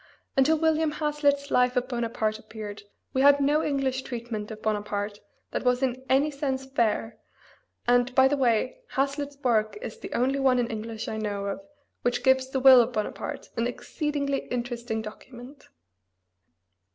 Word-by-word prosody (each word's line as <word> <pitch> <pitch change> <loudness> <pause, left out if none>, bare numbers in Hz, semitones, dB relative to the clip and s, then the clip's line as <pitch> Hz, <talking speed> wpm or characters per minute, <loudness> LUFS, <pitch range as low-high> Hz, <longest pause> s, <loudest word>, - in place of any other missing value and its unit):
Until 290 +4 +4
William 320 -1 +2
Hazlitt's 290 -2 0
life 250 0 +3
of 250 0 +1
Bonaparte 230 -3 -1
appeared 210 -2 -8 0.3
we 265 - +2
had 285 +1 +6
no 290 +3 +2
English 270 -2 0
treatment 235 -4 -5
of 220 -1 -7
Bonaparte 205 -1 -2 0.3
that - - -2
was 250 +1 +2
in 260 0 -1
any 280 +3 +3
sense 270 -2 -2
fair, 230 -3 -1 0.7
and, 245 +1 +3
by 265 0 +7
the 285 - +1
way, 250 -2 +1
Hazlitt's 280 +1 -1
work 220 -4 +1
is 475 0 -7
the - - -8
only 265 +3 +1
one 265 -2 +3
in 245 0 0
English 220 0 -5
I 220 - -3
know 205 -2 -3
of 200 +8 -3 0.4
which 245 - 0
gives 260 0 +3
the 265 - -1
will 260 -1 +9
of 240 +1 -1
Bonaparte, 215 -2 -4
an 230 +1 0
exceedingly 280 +2 -2
interesting 240 -2 -3
document. 245 +5 -11
250 Hz, 160 wpm, -27 LUFS, 225-275 Hz, 0.7 s, will